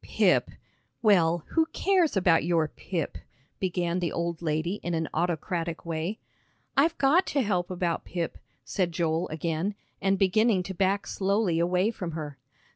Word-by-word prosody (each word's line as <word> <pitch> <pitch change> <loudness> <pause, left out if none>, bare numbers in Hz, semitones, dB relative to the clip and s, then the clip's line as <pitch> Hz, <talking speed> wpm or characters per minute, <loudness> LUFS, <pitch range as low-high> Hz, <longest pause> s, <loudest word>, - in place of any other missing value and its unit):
"Pip! - - +2 0.5
Well, 175 -6 +4
who 320 -1 +2
cares 365 - +2
about 175 -3 +4
your 165 -2 +2
Pip?" 165 0 -4 0.4
began 180 -1 0
the 175 -2 -1
old 170 -1 -2
lady 165 +4 -1
in 175 -1 -2
an 160 -1 -1
autocratic 170 -1 -2
way. 165 +5 -2 0.6
"I've 305 +4 +3
got 295 +7 +4
to 280 -2 +1
help 180 -4 0
about 175 -2 -1
Pip," 170 -2 -4 0.3
said 180 -4 -1
Joel 165 0 0
again, 165 +5 -2 0.3
and 195 0 +2
beginning 195 +1 +3
to 190 - -5
back 195 +2 +1
slowly 195 -3 +1
away 180 +5 +2
from 180 -7 -5
her. 150 -4 -6
175 Hz, 150 wpm, -27 LUFS, 165-200 Hz, 0.6 s, Well